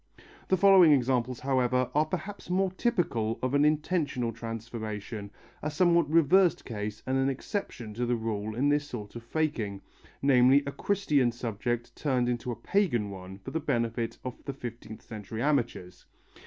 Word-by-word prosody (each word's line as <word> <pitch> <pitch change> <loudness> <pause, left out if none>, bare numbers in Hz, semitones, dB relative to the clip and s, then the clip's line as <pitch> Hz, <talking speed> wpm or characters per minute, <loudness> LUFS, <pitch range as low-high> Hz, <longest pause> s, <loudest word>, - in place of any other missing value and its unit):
The 190 - +3
following 190 -3 +7
examples, 125 -2 +1
however, 130 -2 +1
are 150 +1 +2
perhaps 195 +4 -5
more 185 +1 +1
typical 170 - 0
of 130 +1 0
an 145 0 +4
intentional 150 -6 0
transformation, 110 -2 -6 0.3
a 150 - -2
somewhat 170 0 +3
reversed 170 +2 +4
case 105 -2 -5
and 130 0 +1
an 135 +1 +2
exception 125 - -4
to 120 +3 -2
the 120 - +2
rule 110 -1 -3
in 140 +4 +2
this 145 0 +1
sort 110 -6 -7
of 120 - -6
faking, 115 -7 -2 0.4
namely 135 +1 +5
a 140 - -3
Christian 145 -6 +1
subject 120 0 -3
turned 130 -4 0
into 120 0 -2
a - - -3
pagan 120 - 0
one 95 0 -9
for 95 - -9
the 160 - -1
benefit 115 -5 -1
of 125 - -6
the 140 - -3
fifteenth 120 -4 -8
century 110 +1 -6
amateurs. 120 -11 -1
125 Hz, 160 wpm, -29 LUFS, 115-150 Hz, 0.4 s, following